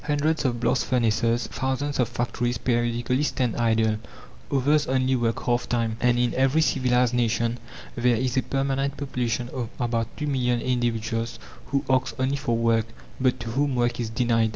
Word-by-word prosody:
Hundreds 150 Hz, +1 st, +1 dB
of 120 Hz, -2 st, 0 dB
blast 120 Hz, +2 st, +1 dB
furnaces, 115 Hz, -1 st, +1 dB
thousands 135 Hz, +2 st, -2 dB
of 120 Hz, -3 st, +2 dB
factories 120 Hz, 0 st, -1 dB
periodically 120 Hz, +2 st, 0 dB
stand 125 Hz, -5 st, 0 dB
idle, 110 Hz, -2 st, +2 dB, 0.5 s
others 145 Hz, +2 st, +2 dB
only 130 Hz, 0 st, +2 dB
work 115 Hz, -2 st, -1 dB
half 120 Hz, 0 st, 0 dB
time 115 Hz, -2 st, 0 dB
and 120 Hz, 0 st, +3 dB
in 120 Hz, 0 st, +1 dB
every 135 Hz, +4 st, +2 dB
civilized 125 Hz, -4 st, +2 dB
nation 115 Hz, 0 st, +1 dB, 0.4 s
there 120 Hz, 0 st, +3 dB
is 125 Hz, +1 st, -1 dB
a 130 Hz, -, +3 dB
permanent 135 Hz, +1 st, -1 dB
population 125 Hz, -4 st, -2 dB
of 120 Hz, -3 st, -4 dB
about 115 Hz, -2 st, 0 dB
two 150 Hz, -, -3 dB
million 125 Hz, -4 st, +1 dB
individuals 115 Hz, -2 st, -1 dB, 0.3 s
who 140 Hz, 0 st, -1 dB
ask 130 Hz, 0 st, 0 dB
only 130 Hz, +2 st, +1 dB
for 120 Hz, -4 st, -1 dB
work, 115 Hz, -1 st, +2 dB, 0.3 s
but 130 Hz, -1 st, +1 dB
to 115 Hz, -, -5 dB
whom 140 Hz, +2 st, 0 dB
work 120 Hz, 0 st, 0 dB
is 115 Hz, -2 st, -2 dB
denied. 115 Hz, -1 st, +2 dB
125 Hz, 170 wpm, -25 LUFS, 115-130 Hz, 0.5 s, and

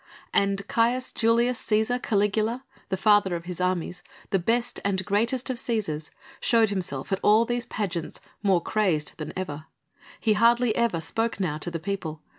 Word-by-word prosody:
And 200 Hz, 0 st, +1 dB
Caius 245 Hz, +3 st, +1 dB
Julius 235 Hz, +2 st, +2 dB
Cæsar 220 Hz, +3 st, +1 dB
Caligula, 215 Hz, +4 st, 0 dB, 0.3 s
the 190 Hz, -, -1 dB
father 205 Hz, -2 st, +4 dB
of 170 Hz, 0 st, -6 dB
his 180 Hz, 0 st, -5 dB
armies, 180 Hz, -1 st, -1 dB, 0.3 s
the 195 Hz, -, +3 dB
best 235 Hz, +6 st, 0 dB
and 190 Hz, -2 st, 0 dB
greatest 235 Hz, +6 st, +1 dB
of 250 Hz, -, -4 dB
Cæsars, 200 Hz, -, -2 dB, 0.3 s
showed 225 Hz, -3 st, +3 dB
himself 175 Hz, -9 st, -3 dB
at 195 Hz, -, +1 dB
all 215 Hz, +2 st, +5 dB
these 240 Hz, 0 st, -2 dB
pageants 175 Hz, -6 st, -3 dB, 0.2 s
more 195 Hz, -4 st, +3 dB
crazed 180 Hz, -9 st, 0 dB
than 155 Hz, 0 st, -5 dB
ever; 155 Hz, -4 st, -5 dB, 0.5 s
he 220 Hz, -, +3 dB
hardly 235 Hz, +1 st, +3 dB
ever 235 Hz, -8 st, +1 dB
spoke 225 Hz, +6 st, -2 dB
now 155 Hz, -6 st, -1 dB
to 175 Hz, -, -3 dB
the 170 Hz, -, -3 dB
people. 160 Hz, -4 st, -4 dB
205 Hz, 165 wpm, -26 LUFS, 180-230 Hz, 0.5 s, all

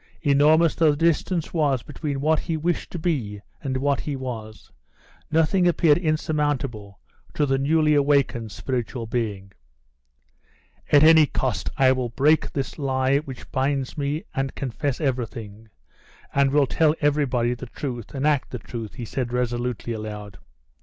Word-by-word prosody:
Enormous 155 Hz, +3 st, +4 dB
though 160 Hz, -2 st, +3 dB
the 145 Hz, -, +1 dB
distance 165 Hz, +1 st, 0 dB
was 145 Hz, -7 st, +1 dB
between 145 Hz, -2 st, -4 dB
what 155 Hz, +2 st, +2 dB
he 165 Hz, -2 st, -2 dB
wished 170 Hz, +2 st, -1 dB
to -, -, -4 dB
be 135 Hz, -, -2 dB, 0.2 s
and 130 Hz, -1 st, -2 dB
what 140 Hz, +1 st, +1 dB
he 145 Hz, -, -3 dB
was, 115 Hz, -5 st, -7 dB, 0.6 s
nothing 165 Hz, +3 st, +3 dB
appeared 165 Hz, -2 st, +4 dB
insurmountable 145 Hz, -, -2 dB, 0.4 s
to 150 Hz, -, +2 dB
the 135 Hz, -1 st, +1 dB
newly 150 Hz, +2 st, +3 dB
awakened 140 Hz, -6 st, +2 dB
spiritual 120 Hz, +2 st, -3 dB
being. 105 Hz, -4 st, -3 dB, 1.4 s
"At 145 Hz, 0 st, +7 dB
any 160 Hz, -1 st, +7 dB
cost 120 Hz, -10 st, -2 dB
I 130 Hz, -1 st, +5 dB
will 130 Hz, -2 st, -1 dB
break 150 Hz, +7 st, +2 dB
this 135 Hz, +2 st, -4 dB
lie 135 Hz, 0 st, +1 dB
which 135 Hz, -4 st, -10 dB
binds 135 Hz, 0 st, -1 dB
me 145 Hz, +1 st, -2 dB
and 135 Hz, 0 st, -2 dB
confess 135 Hz, +1 st, -3 dB
everything, 115 Hz, -6 st, -4 dB, 0.6 s
and 140 Hz, 0 st, +3 dB
will 145 Hz, 0 st, +3 dB
tell 155 Hz, +4 st, +2 dB
everybody 135 Hz, -5 st, +1 dB
the 125 Hz, +1 st, -8 dB
truth, 120 Hz, 0 st, -6 dB
and 135 Hz, +1 st, -1 dB
act 150 Hz, -3 st, +1 dB
the 125 Hz, -, -5 dB
truth," 115 Hz, -2 st, -7 dB
he 120 Hz, -, -6 dB
said 120 Hz, +1 st, -3 dB
resolutely, 120 Hz, -1 st, -2 dB
aloud. 105 Hz, -3 st, -7 dB
135 Hz, 150 wpm, -24 LUFS, 120-150 Hz, 1.4 s, At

